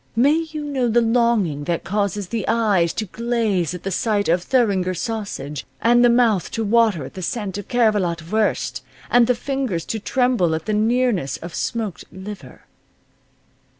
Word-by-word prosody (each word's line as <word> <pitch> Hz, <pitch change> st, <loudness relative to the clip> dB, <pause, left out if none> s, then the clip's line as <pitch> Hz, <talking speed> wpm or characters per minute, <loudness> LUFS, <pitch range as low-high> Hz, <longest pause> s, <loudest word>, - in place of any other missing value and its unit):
May 295 Hz, +7 st, +3 dB
you 305 Hz, -1 st, -5 dB
know 275 Hz, -4 st, -1 dB
the 235 Hz, +1 st, +3 dB
longing 225 Hz, -, +1 dB
that 170 Hz, +1 st, -1 dB
causes 200 Hz, -1 st, -2 dB
the 230 Hz, -3 st, -2 dB
eyes 205 Hz, -7 st, +2 dB
to 220 Hz, -, -3 dB
glaze 215 Hz, -5 st, -1 dB
at 180 Hz, -, -9 dB
the 195 Hz, -, -3 dB
sight 205 Hz, +1 st, 0 dB
of 175 Hz, +2 st, +2 dB
Thuringer 195 Hz, -6 st, +1 dB
sausage, 190 Hz, -, -4 dB, 0.2 s
and 240 Hz, +1 st, +4 dB
the 245 Hz, -, +6 dB
mouth 235 Hz, -6 st, +3 dB
to 225 Hz, -, -1 dB
water 215 Hz, -, +2 dB
at -, -, -10 dB
the 190 Hz, -, -7 dB
scent 205 Hz, 0 st, -3 dB
of 205 Hz, -, -9 dB
Cervelat 205 Hz, -9 st, +1 dB
wurst, 220 Hz, 0 st, 0 dB, 0.3 s
and 240 Hz, -1 st, +5 dB
the 250 Hz, -, +3 dB
fingers 260 Hz, -10 st, -2 dB
to 220 Hz, -, -3 dB
tremble 240 Hz, -8 st, +1 dB
at 160 Hz, -, -5 dB
the 215 Hz, -, -1 dB
nearness 220 Hz, -, +1 dB
of 170 Hz, 0 st, -9 dB
smoked 220 Hz, -7 st, -3 dB
liver. 190 Hz, +2 st, -10 dB
215 Hz, 170 wpm, -21 LUFS, 185-235 Hz, 0.3 s, the